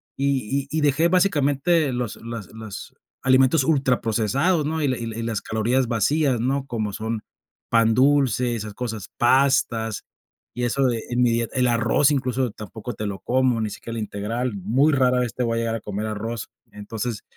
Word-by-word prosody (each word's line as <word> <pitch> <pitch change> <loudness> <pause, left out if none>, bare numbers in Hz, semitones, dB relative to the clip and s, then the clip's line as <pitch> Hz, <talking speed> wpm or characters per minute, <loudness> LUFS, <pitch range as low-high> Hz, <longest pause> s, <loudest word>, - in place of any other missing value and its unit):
y 135 0 -1
y 155 - -2
y - - +1
dejé 150 +3 +3
básicamente 165 -4 +2
los 120 -3 -3
las 115 -4 -7
los 110 -2 -9 0.3
alimentos 130 +3 +4
ultraprocesados, 135 - +1
¿no?, 160 +1 -1
y 145 - +1
la 130 -2 0
y 115 - -5
la 110 -1 -6
y - - -3
las 115 -3 -2
calorías 120 +4 0
vacías, 130 +3 +1
¿no?, 135 +3 0
como 110 -5 -3
son, 110 +1 -3 0.5
pan 115 -1 +4
dulce, 130 -2 +3
esas 110 -2 -5
cosas, 110 -3 -5
pastas, 120 -4 +2 0.5
y 125 - -3
eso 125 +3 +1
de 120 -3 0
en 120 0 0
mi 120 -1 +4
dieta 115 0 -1
el 125 -1 +3
arroz 120 +5 +3
incluso 130 -3 0
tampoco 110 +3 -8
te 105 +1 -5
lo 100 -1 -5
como, 130 -1 +1
ni 110 - -1
siquiera 115 +3 -7
el 110 - -2
integral, 110 +4 -3
muy 120 +11 +2
rara 125 -2 +3
vez 125 -2 -1
te 125 - -2
voy 115 -1 0
a - - +1
llegar 115 -1 -1
a 115 - -5
comer 105 +1 -4
arroz. 110 +1 -4 0.2
Entonces, 105 +2 -5
120 Hz, 190 wpm, -23 LUFS, 110-135 Hz, 0.5 s, alimentos